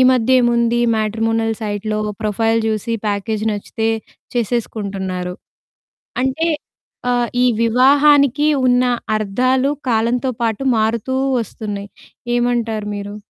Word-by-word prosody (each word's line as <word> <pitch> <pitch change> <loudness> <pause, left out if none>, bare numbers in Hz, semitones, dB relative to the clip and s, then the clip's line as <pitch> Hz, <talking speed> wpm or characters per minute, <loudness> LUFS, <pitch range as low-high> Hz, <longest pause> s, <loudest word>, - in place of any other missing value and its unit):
ఈ - - +7
మధ్య 250 0 +1
ఏముంది 235 0 +2 0.2
మ్యాట్రిమోనల్ 225 +1 0
సైట్‌లో 215 0 -2 0.2
ప్రొఫైల్ 225 +2 +1
చూసి 220 +1 -1
ప్యాకేజ్ 210 +1 -1
నచ్చితే 220 +2 -3 0.5
చేసేసుకుంటున్నారు. 200 -6 -2 0.9
అంటే, 290 +6 0 0.6
ఆహ్, 240 -1 +1 0.2
ఈ - - +5 0.2
వివాహానికి 280 +4 +4 0.2
ఉన్న 250 0 +4 0.3
అర్థాలు 255 +7 +1 0.2
కాలంతో 235 +3 +1
పాటు 225 +2 -1 0.2
మారుతూ 230 +4 0 0.2
వస్తున్నాయి. 205 -1 -6 0.5
ఏమంటారు 235 -3 0
మీరు? 205 0 -6
225 Hz, 100 wpm, -18 LUFS, 210-245 Hz, 0.9 s, ఈ